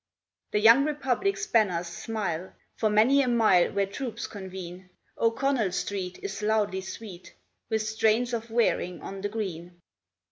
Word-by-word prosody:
The 210 - +1
young 230 +6 +7
Republic's 300 - -1
banners 195 - +2
smile 180 -1 -4 0.2
For 220 - +1
many 225 +7 +5
a 265 - 0
mile 220 -7 +4
where 200 0 +1
troops 235 +3 -5
convene. 185 -2 -8 0.3
O'Connell 230 -2 +1
Street 185 -1 -3
is 400 - -5
loudly 210 -3 +1
sweet 190 -1 -9 0.3
With 220 -1 0
strains 220 +3 +1
of 230 0 -3
Wearing 220 -6 +1
of 195 0 -7
the 205 - -2
Green. 180 -5 -5
215 Hz, 140 wpm, -27 LUFS, 190-235 Hz, 0.3 s, young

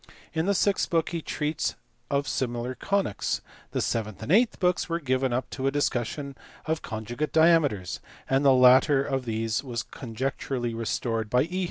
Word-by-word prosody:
In 160 +2 0
the 200 - +2
sixth 200 +1 +2
book 165 -2 +1
he 170 -2 -3
treats 150 0 -2 0.3
of 140 0 0
similar 120 0 -2
conies. 195 - -1 0.3
The - - -2
seventh 110 -3 -2
and 130 - -3
eighth 225 +5 +4
books 180 -1 +1
were 170 0 0
given 130 -3 0
up 125 +1 -1
to 135 0 -2
a - - +2
discussion 140 0 -1 0.3
of 160 0 -1
conj 110 0 -6
ugate 155 +4 -1
diameters, 160 - +3 0.3
the 135 +1 +4
latter 130 +2 +6
of 135 -2 -2
these 115 +2 -1
was 120 -3 -3
conjecturally 125 0 -3
restored 115 0 -2
by 125 +2 +3
E. 180 +4 -3
135 Hz, 170 wpm, -27 LUFS, 120-155 Hz, 0.3 s, latter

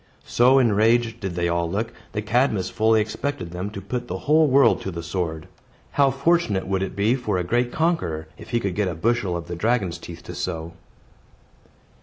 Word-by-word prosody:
So 125 +3 +4
enraged 115 0 +3
did 95 -5 -4
they 85 0 0
all 85 0 0
look, 110 +5 -2 0.2
that 105 0 -2
Cadmus 110 -4 +1
fully 110 0 +3
expected 105 -3 -4
them 90 +3 -4
to 105 - -7
put 120 +5 -4
the - - -3
whole 155 +1 +3
world 135 -3 +4
to - - -4
the 85 -2 -6
sword. 85 -2 -3 0.4
How 140 -1 +4
fortunate 135 - +1
would 95 0 -1
it 95 - -3
be 105 +4 +2
for 120 -7 -1
a 90 - 0
great 120 +7 0
conqueror, 90 - -1
if - - -13
he 120 - +1
could 100 -5 -2
get 105 +1 0
a 90 - -3
bushel 105 -1 0
of 85 - -7
the 85 - -4
dragon's 100 -3 0
teeth - - -10
to - - -8
sow! 85 -2 -4
105 Hz, 200 wpm, -23 LUFS, 90-120 Hz, 0.4 s, So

